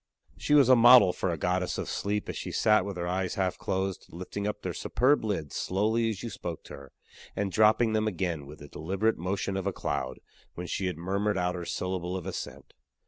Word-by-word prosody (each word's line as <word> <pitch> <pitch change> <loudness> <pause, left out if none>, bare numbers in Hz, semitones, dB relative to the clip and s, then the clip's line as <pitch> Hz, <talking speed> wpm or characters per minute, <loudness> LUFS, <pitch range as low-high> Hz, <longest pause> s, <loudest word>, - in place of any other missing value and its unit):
She 150 - +1
was 140 -4 +6
a 130 - +7
model 120 -5 +8
for 95 - -2
a 85 - -1
goddess 90 +3 -1
of - - -3
sleep 105 +1 -2
as - - -4
she - - -5
sat 105 -3 +3
with 100 -2 -5
her 85 0 -3
eyes 90 +1 -1
half 95 -2 -1
closed, 95 0 -2
lifting 90 +4 -5
up 105 - -4
their - - -3
superb 130 +3 +2
lids 95 -9 -3
slowly 110 +4 +1
as 110 0 -5
you 115 - -4
spoke 85 -2 -6
to - - -11
her, 70 -2 -11 0.4
and 100 -1 -1
dropping 110 +2 +4
them 110 0 +1
again 85 -7 -2
with 75 +2 -10
the 75 - -11
deliberate 95 +9 -1
motion 95 +2 -2
of 95 0 -2
a - - +1
cloud, 70 -6 -3 0.4
when 90 - -5
she 95 +2 -2
had 90 - -3
murmured 100 +4 -1
out 90 0 0
her 90 -1 -5
syllable 90 0 -3
of 90 - -7
assent. 95 - -7
95 Hz, 220 wpm, -28 LUFS, 90-105 Hz, 0.4 s, model